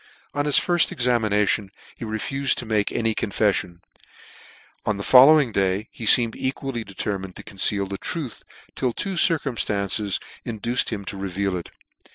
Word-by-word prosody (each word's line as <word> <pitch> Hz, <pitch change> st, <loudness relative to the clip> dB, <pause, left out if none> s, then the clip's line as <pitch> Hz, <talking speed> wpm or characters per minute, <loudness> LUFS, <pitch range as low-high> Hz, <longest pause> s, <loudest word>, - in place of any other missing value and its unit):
On 145 Hz, 0 st, -1 dB
his 150 Hz, -, +4 dB
firfl 175 Hz, -1 st, +3 dB
examination 110 Hz, -4 st, +1 dB, 0.3 s
he -, -, -7 dB
refufed 130 Hz, +6 st, -1 dB
to 120 Hz, -, -5 dB
make 110 Hz, -2 st, 0 dB
any 115 Hz, -1 st, 0 dB
confeffion: 105 Hz, -1 st, 0 dB
and 85 Hz, 0 st, -20 dB, 1.0 s
on 105 Hz, -, -1 dB
the 100 Hz, -, -5 dB
following 135 Hz, +1 st, +6 dB
day, 100 Hz, +1 st, -1 dB
he 115 Hz, -, -6 dB
feemed 115 Hz, -1 st, +6 dB
equally 130 Hz, -2 st, -4 dB
determined 95 Hz, -2 st, -5 dB
to -, -, -10 dB
conceal 100 Hz, 0 st, 0 dB
the 100 Hz, 0 st, -6 dB
truth, 145 Hz, -10 st, -5 dB, 0.4 s
nil 125 Hz, -3 st, 0 dB
two 195 Hz, -, -3 dB
circumftances 105 Hz, -, 0 dB, 0.2 s
induced 115 Hz, +2 st, -1 dB
him 100 Hz, -3 st, -5 dB
to 100 Hz, -, -6 dB
reveal 95 Hz, 0 st, -2 dB
it. 85 Hz, -, -6 dB
110 Hz, 155 wpm, -23 LUFS, 100-125 Hz, 1.0 s, following